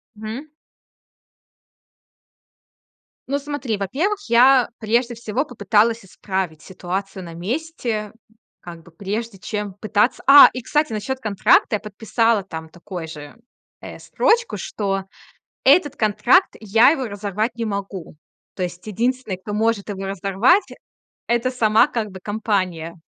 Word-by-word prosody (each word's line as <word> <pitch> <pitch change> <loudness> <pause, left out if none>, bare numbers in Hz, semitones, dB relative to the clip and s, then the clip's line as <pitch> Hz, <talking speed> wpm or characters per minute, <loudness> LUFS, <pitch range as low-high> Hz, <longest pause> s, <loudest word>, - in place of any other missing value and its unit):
Мгм. 220 +8 -7 2.8
Ну, 280 +1 0
смотри, 285 -6 -3
во-первых, 305 - -1
я 250 +1 +5
прежде 235 +2 0
всего 235 +4 -2
попыталась 225 -2 +1
исправить 185 -4 -4
ситуацию 190 +1 -5
на 170 -1 -9
месте. 225 - -3 0.5
Как 170 -2 -10
бы 170 - -18
прежде 205 +4 -5
чем 210 -1 -4
пытаться 210 +3 0
А, 285 +1 +11
и 250 - -5
кстати, 300 0 0
насчёт 260 +5 -3
контракта 215 -1 +3
я - - -16
подписала 220 +1 0
там 160 -3 -8
такой 175 0 -8
же, 150 -2 -10 0.5
э, - - -9
строчку, 470 +1 +1
что 195 -2 -3 0.6
этот 290 0 +5
контракт 240 - +3
я 220 +4 +5
его 270 -4 0
разорвать 210 +2 -3
не 230 - -3
могу. 200 -5 -5 0.4
То 185 - -3
есть 175 0 -6
единственный, 235 0 -1
кто 205 +3 -7
может 220 -1 0
его 195 -1 -5
разорвать- 200 - +2 0.7
это 235 +2 +1
сама, 220 -3 +4
как 220 -3 -3
бы, 190 - -9
компания. 185 -5 -2
215 Hz, 125 wpm, -21 LUFS, 195-245 Hz, 2.8 s, А